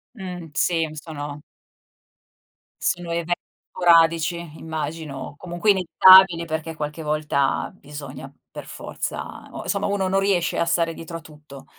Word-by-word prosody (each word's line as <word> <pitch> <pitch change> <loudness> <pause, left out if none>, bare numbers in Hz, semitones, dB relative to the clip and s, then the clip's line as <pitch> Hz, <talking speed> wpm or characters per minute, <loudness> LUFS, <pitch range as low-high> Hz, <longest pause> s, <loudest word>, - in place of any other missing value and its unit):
Mh, 180 -5 -7
sì, 165 0 +1
sono 150 -2 -7 1.4
sono 175 -1 -1
even 170 +1 0 0.4
sporadici 165 -1 +4 0.2
immagino, 155 -3 -5
comunque 175 +4 +1
inevitabile, 185 -1 +7
perché 160 0 -4
qualche 150 +1 -5
volta 150 -2 0
bisogna 140 -4 -9 0.2
per - - -8
forza - - -6
o - - -7
insomma - - -1
uno 200 -2 0
non 195 +1 +2
riesce 190 -4 +1
a 170 - +2
stare 170 -1 +1
dietro 165 +1 -7
a - - -9
tutto. 150 -3 -14
165 Hz, 125 wpm, -23 LUFS, 150-175 Hz, 1.4 s, inevitabile